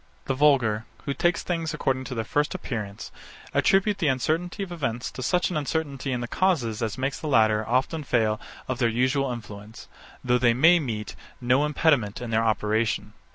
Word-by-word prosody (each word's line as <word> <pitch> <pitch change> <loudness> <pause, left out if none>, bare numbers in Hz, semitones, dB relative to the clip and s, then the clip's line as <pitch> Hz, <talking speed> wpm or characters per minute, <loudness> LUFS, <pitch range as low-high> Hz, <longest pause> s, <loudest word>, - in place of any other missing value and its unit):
The 135 - 0
vulgar, 130 -6 +3 0.2
who 140 - -1
take 175 +4 +1
things 165 -3 -2
according 130 -3 -1
to 130 - -5
their 115 - -1
first 145 +5 0
appearance, 105 -5 -5 0.4
attribute 195 +1 +3
the 165 - +1
uncertainty 160 - 0
of 185 - -8
events 130 -8 -3
to - - -8
such 180 +8 +1
an 165 - -1
uncertainty 145 -2 -2
in 125 -1 -1
the 120 - -3
causes 125 - 0
as 110 0 -2
makes 135 +1 -2
the 155 - -5
latter 110 -5 +3
often 135 +6 0
fail 110 -5 +1 0.3
of 130 -1 -3
their 120 -2 +3
usual 130 +3 +1
influence; 105 -2 -9 0.4
though 125 0 +2
they 120 -1 +3
meet 160 +2 +5 0.2
with - - -9 0.2
no 130 +4 +2
impediment 145 -9 +1
in 120 -1 -6
their 110 0 +2
operation. 110 -1 0
130 Hz, 185 wpm, -25 LUFS, 115-150 Hz, 0.4 s, meet